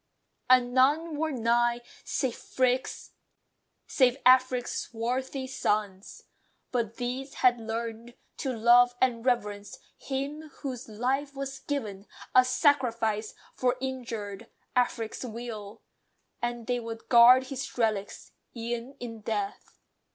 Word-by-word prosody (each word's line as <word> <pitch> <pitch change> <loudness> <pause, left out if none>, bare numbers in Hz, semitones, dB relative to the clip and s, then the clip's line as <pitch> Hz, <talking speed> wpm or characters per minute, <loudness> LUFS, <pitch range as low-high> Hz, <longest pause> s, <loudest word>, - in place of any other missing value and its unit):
And 250 -1 +5
none 295 +5 +3
were 315 +1 -1
nigh, 240 -1 +1 0.2
Save 260 -3 -4
Afric's 255 +1 +1 1.7
swarthy 255 +4 -3
sons. 210 -6 -2 0.5
But 230 -3 -1
these 255 +3 -4
had 245 -1 +3
learned 230 +1 -5 0.2
To 270 - -2
love 245 +1 +5
and 235 -3 +1
reverence 205 -5 -1 0.2
him 285 +3 -5
whose 255 -4 -5
life 265 +6 -1
was 275 0 -5
given 210 -9 -4 0.3
A 255 - +8
sacrifice 240 -5 +1 0.2
for 250 0 0
injured 230 -7 -5 0.3
Afric's 240 -2 0
weal; 225 -3 -7 0.6
And 240 -1 -3
they 245 0 0
would 225 -1 -7
guard 245 +2 +8
his 270 -1 -6
relics, 215 -4 -1 0.2
e'en 235 +3 -4
in 230 -2 -7
death. 205 -2 -4
245 Hz, 105 wpm, -28 LUFS, 225-260 Hz, 1.7 s, A